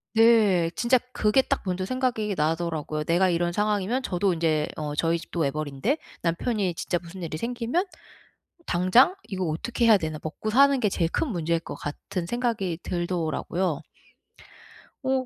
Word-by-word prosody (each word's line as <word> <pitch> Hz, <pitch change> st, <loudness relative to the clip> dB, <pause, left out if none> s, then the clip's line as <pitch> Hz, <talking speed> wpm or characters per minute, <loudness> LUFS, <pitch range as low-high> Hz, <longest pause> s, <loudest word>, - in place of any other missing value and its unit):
네. 215 Hz, -7 st, +5 dB
진짜 245 Hz, +1 st, +3 dB
그게 215 Hz, +4 st, +3 dB
딱 -, -, -2 dB
먼저 185 Hz, 0 st, -1 dB
생각이 235 Hz, -5 st, -1 dB
나더라고요. 155 Hz, -1 st, -1 dB
'내가 175 Hz, +4 st, +3 dB
이런 175 Hz, 0 st, +1 dB
상황이면' 210 Hz, +5 st, 0 dB
저도 185 Hz, -1 st, +1 dB
인제 160 Hz, -2 st, +1 dB
어 150 Hz, -1 st, -3 dB
저희 165 Hz, +2 st, +1 dB
집도 170 Hz, +1 st, -7 dB
외벌이인데 150 Hz, -, -1 dB, 0.2 s
'남편이 180 Hz, +1 st, 0 dB
진짜 175 Hz, 0 st, -1 dB
무슨 175 Hz, +1 st, -9 dB
일이 155 Hz, -1 st, -4 dB
생기면 245 Hz, -, -1 dB, 0.8 s
당장 185 Hz, -, +4 dB
이거 190 Hz, -2 st, -2 dB
어떻게 205 Hz, +10 st, -1 dB
해야 220 Hz, -2 st, +8 dB
되나.' 155 Hz, -4 st, -3 dB
먹고 165 Hz, +7 st, -4 dB
사는 275 Hz, +3 st, +5 dB
게 210 Hz, -, +2 dB
제일 170 Hz, -3 st, 0 dB
큰 315 Hz, -, 0 dB
문제일 170 Hz, -4 st, 0 dB
것 -, -, -7 dB
같은 170 Hz, +4 st, -5 dB
생각이 225 Hz, -7 st, -1 dB
들더라고요. 175 Hz, -1 st, -2 dB, 1.3 s
어 260 Hz, -1 st, +1 dB
185 Hz, 330 characters per minute, -26 LUFS, 165-230 Hz, 1.3 s, 해야